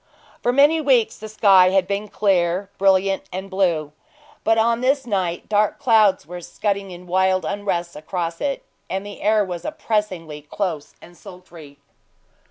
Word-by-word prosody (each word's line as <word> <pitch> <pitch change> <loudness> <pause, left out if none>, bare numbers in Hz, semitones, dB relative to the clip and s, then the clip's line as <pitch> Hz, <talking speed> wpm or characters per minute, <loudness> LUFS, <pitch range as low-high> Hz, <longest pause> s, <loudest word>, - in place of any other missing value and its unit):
For 245 - +1
many 290 +5 +4
weeks 255 -6 +2
the 215 - -8
sky 195 -4 +5
had 190 0 +2
been 200 +2 -3
clear, 190 -1 0
brilliant, 195 0 +2
and 190 +2 -6
blue; 170 -6 0 0.5
but 225 0 +2
on 230 +1 +2
this 270 +1 +1
night 185 -6 -2
dark 210 -1 +1
clouds 215 - +3
were 175 +2 -8
scudding 200 +2 -3
in 180 0 -11
wild 185 0 +1
unrest 175 -2 -3
across 165 +2 -4
it, 280 -1 -2 0.3
and 195 +1 -3
the 205 - -10
air 210 0 +2
was 175 -2 -6
oppressingly 210 - -3
close 160 0 -4
and 175 - -15
sultry. 175 -7 -14
195 Hz, 155 wpm, -21 LUFS, 175-215 Hz, 0.5 s, sky